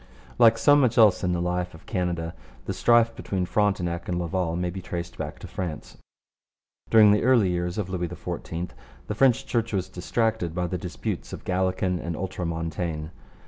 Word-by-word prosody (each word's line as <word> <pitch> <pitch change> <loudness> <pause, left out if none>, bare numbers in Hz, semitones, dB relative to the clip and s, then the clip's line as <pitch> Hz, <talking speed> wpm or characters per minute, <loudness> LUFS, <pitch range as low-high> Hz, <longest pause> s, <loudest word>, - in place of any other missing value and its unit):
Like 115 -1 +7
so 145 +4 +5
much 130 -5 +3
else 105 -6 +6
in 90 - +1
the 85 -1 0
life 90 0 -2
of 80 - -16
Canada, 85 -3 -2 0.3
the - - -2
strife 115 -1 +4
between 95 -2 -2
Frontenac 90 -4 0
and 90 - 0
Laval 85 -1 -1
may 90 0 -1
be 95 +2 -6
traced 85 -1 -5
back 75 -1 -5
to - - -9
France. 85 -5 -6 0.9
During 110 -2 +7
the 105 - +3
early 120 -6 +4
years 90 0 -2
of 105 -4 -1
Louis 90 -2 -2
XIV 85 -1 -5 0.3
the - - -3
French 125 +2 +3
Church 115 -2 -1
was 95 -1 -1
distracted 95 -1 -1
by 90 -1 0
the 90 +1 -3
disputes 90 0 -5
of - - -7
Gallican 95 -1 0
and 85 -1 -4
Ultramontane. 85 -3 -3
90 Hz, 180 wpm, -26 LUFS, 85-105 Hz, 0.9 s, Like